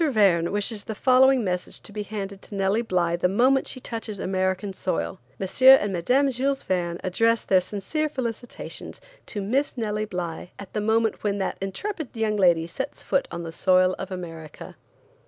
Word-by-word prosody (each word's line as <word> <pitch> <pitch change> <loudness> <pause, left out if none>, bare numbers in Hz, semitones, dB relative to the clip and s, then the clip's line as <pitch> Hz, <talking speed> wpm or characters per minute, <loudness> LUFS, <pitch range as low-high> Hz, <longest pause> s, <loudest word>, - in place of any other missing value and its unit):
Verne 195 -8 +3
wishes 205 +1 -2
the 220 - -5
following 260 +2 +5
message 180 -2 -3
to - - -9
be 210 0 -4
handed 200 -2 -6
to 205 - -10
Nellie 195 +3 +1
Bly 180 -6 +1
the 180 - +2
moment 255 +8 +3
she 255 - -4
touches 225 -4 -5
American 190 +1 -1
soil: 85 - -2 0.2
M. 190 - -2 0.3
and 205 -1 -2
Mme. 255 +11 +2
Jules 270 +2 -1
Verne 175 -2 -1
address 225 +5 +2
their 185 -1 +4
sincere 215 - -2
felicitations 245 -4 -5 0.3
to 205 -3 -4
Miss 265 +7 0
Nellie 215 -2 -1
Bly 180 -3 -5
at 200 -2 -10
the 210 - -1
moment 220 +1 +1
when 205 -1 0
that 195 - -2
intrepid 290 - -4
young 220 -1 0
lady 175 -5 +4
sets 265 +11 -6
foot 275 - +1
on 170 - -5
the 165 - -6
soil 185 +2 +3
of - - -5
America." 165 -4 -8
205 Hz, 175 wpm, -25 LUFS, 185-230 Hz, 0.3 s, following